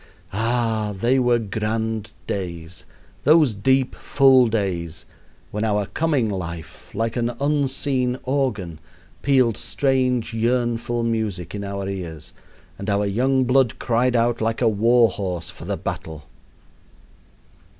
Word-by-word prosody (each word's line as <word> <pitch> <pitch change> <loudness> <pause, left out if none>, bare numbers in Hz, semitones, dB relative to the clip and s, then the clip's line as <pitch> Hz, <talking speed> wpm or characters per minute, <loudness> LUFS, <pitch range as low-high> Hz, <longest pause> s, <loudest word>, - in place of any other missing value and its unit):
Ah! 115 -1 0
they 125 +5 +3
were 120 -1 +3
grand 110 0 -2
days, 85 -2 -5 0.4
those 150 -4 +5
deep, 130 +5 +2
full 135 -3 +4
days, 90 -7 -2 0.5
when 105 +1 -2
our 105 -2 +1
coming 145 -2 0
life, 85 -5 -6
like 115 +1 -1
an 120 -1 0
unseen 135 -3 +1
organ, 110 - -1 0.4
pealed 130 -5 +3
strange, 130 -4 0
yearnful 120 0 0
music 110 -7 -2
in 100 -1 -4
our 100 -1 -4
ears, 90 -6 -6 0.5
and 100 - -4
our 100 0 +1
young 130 +6 +2
blood 130 -1 +2
cried 125 +1 +1
out 120 0 +2
like 115 0 0
a - - +3
war 115 +3 +4
horse 90 -4 -4
for - - -11
the - - -2
battle. 80 -2 -5
115 Hz, 125 wpm, -22 LUFS, 100-125 Hz, 0.5 s, those